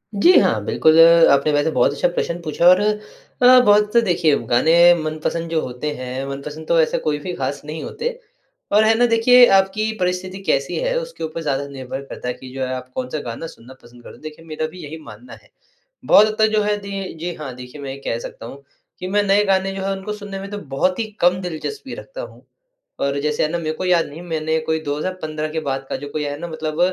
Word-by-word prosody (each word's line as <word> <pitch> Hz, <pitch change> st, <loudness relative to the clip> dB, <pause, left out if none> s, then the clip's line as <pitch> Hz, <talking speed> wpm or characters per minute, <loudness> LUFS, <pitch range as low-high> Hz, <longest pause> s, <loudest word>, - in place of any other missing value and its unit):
जी, 270 Hz, -, +5 dB
हाँ -, -, +1 dB
बिल्कुल, 160 Hz, 0 st, +3 dB
अ, 165 Hz, 0 st, +8 dB
आपने 140 Hz, +2 st, +3 dB
वैसे 145 Hz, +2 st, +1 dB
बहुत 125 Hz, -2 st, +2 dB
अच्छा 145 Hz, -, +1 dB
प्रश्न 175 Hz, 0 st, -3 dB
पूछा 170 Hz, +1 st, +1 dB
और 185 Hz, +1 st, +7 dB
अ, 250 Hz, -, +2 dB
बहुत 210 Hz, +1 st, +4 dB
देखिए 170 Hz, -6 st, +2 dB
गाने 125 Hz, +7 st, +3 dB, 0.3 s
मनपसंद 155 Hz, +2 st, -3 dB
जो 165 Hz, -1 st, 0 dB
होते 125 Hz, +4 st, -4 dB
हैं, 130 Hz, +1 st, -5 dB
मनपसंद 150 Hz, +3 st, -7 dB
तो 170 Hz, -, +3 dB
ऐसे 155 Hz, -, 0 dB
कोई 150 Hz, -1 st, -1 dB
भी 180 Hz, +4 st, -5 dB
खास 135 Hz, +1 st, -3 dB
नहीं 155 Hz, +1 st, -6 dB
होते 465 Hz, +2 st, -4 dB, 0.6 s
और 210 Hz, +1 st, +5 dB
है 220 Hz, +1 st, +4 dB
ना, 245 Hz, -, +4 dB
देखिए 245 Hz, +2 st, +6 dB
आपकी 200 Hz, +3 st, 0 dB
परिस्थिति 180 Hz, +1 st, -2 dB
कैसी 135 Hz, 0 st, 0 dB
है, -, -, -1 dB
उसके -, -, -8 dB
ऊपर 160 Hz, +1 st, -4 dB
ज़्यादा 140 Hz, -2 st, -2 dB
निर्भर 135 Hz, -1 st, -7 dB
करता 125 Hz, -, -8 dB
है 125 Hz, -, -1 dB
कि 130 Hz, +1 st, -12 dB
जो 135 Hz, -, -6 dB
है, 130 Hz, -, -4 dB
आप 130 Hz, 0 st, -8 dB
कौन-सा 130 Hz, +4 st, -3 dB
गाना 115 Hz, +8 st, -6 dB
सुनना 125 Hz, -3 st, -14 dB
पसंद 120 Hz, 0 st, -17 dB
कर -, -, -12 dB
देखिए 155 Hz, +1 st, -11 dB
मेरा 155 Hz, 0 st, -3 dB
भी 180 Hz, -, -12 dB
यही 150 Hz, +2 st, -7 dB
मानना 115 Hz, +1 st, -12 dB
है। -, -, -24 dB, 0.6 s
बहुत 215 Hz, +1 st, +6 dB
हद 215 Hz, -, -3 dB
तक 220 Hz, -, +5 dB
जो 210 Hz, -, +2 dB
है 210 Hz, 0 st, +1 dB
दी 195 Hz, -2 st, -6 dB
जी 175 Hz, +2 st, -4 dB
हाँ, 145 Hz, -4 st, -7 dB
देखिए 125 Hz, +3 st, -10 dB
मैं 135 Hz, -, -5 dB
ये -, -, -9 dB
कह 115 Hz, -, -1 dB
सकता 115 Hz, -, -9 dB
हूँ 140 Hz, +3 st, -11 dB, 0.4 s
कि 185 Hz, -, -5 dB
मैं 205 Hz, +2 st, +1 dB
नए 200 Hz, +1 st, +3 dB
गाने 195 Hz, 0 st, +1 dB
जो 190 Hz, -, -4 dB
हैं 195 Hz, -, -1 dB
उनको 200 Hz, +2 st, -5 dB
सुनने 205 Hz, -2 st, -7 dB
में 195 Hz, +1 st, -7 dB
तो 205 Hz, -, -4 dB, 0.2 s
बहुत 185 Hz, +8 st, +1 dB
ही 230 Hz, -, 0 dB, 0.2 s
कम 180 Hz, +1 st, +3 dB
दिलचस्पी 180 Hz, -, -6 dB
रखता -, -, -9 dB
हूँ। -, -, -11 dB, 0.5 s
और 140 Hz, 0 st, -1 dB
जैसे 150 Hz, 0 st, 0 dB
है 155 Hz, -, 0 dB
ना, 170 Hz, -, -2 dB
मेरे 160 Hz, -2 st, -3 dB
को 185 Hz, -, -5 dB
याद 175 Hz, -2 st, +2 dB
नहीं 150 Hz, +4 st, -10 dB
मैंने 160 Hz, -2 st, -1 dB
कोई 160 Hz, 0 st, +1 dB
2015 155 Hz, +1 st, -3 dB
के 160 Hz, -, -1 dB
बाद 135 Hz, 0 st, -3 dB
का -, -, -2 dB
जो 145 Hz, +2 st, -8 dB
कोई 150 Hz, +1 st, -3 dB
है 145 Hz, 0 st, -4 dB
ना, 170 Hz, -, -5 dB
मतलब 155 Hz, -1 st, -5 dB
160 Hz, 235 wpm, -20 LUFS, 145-195 Hz, 0.6 s, अ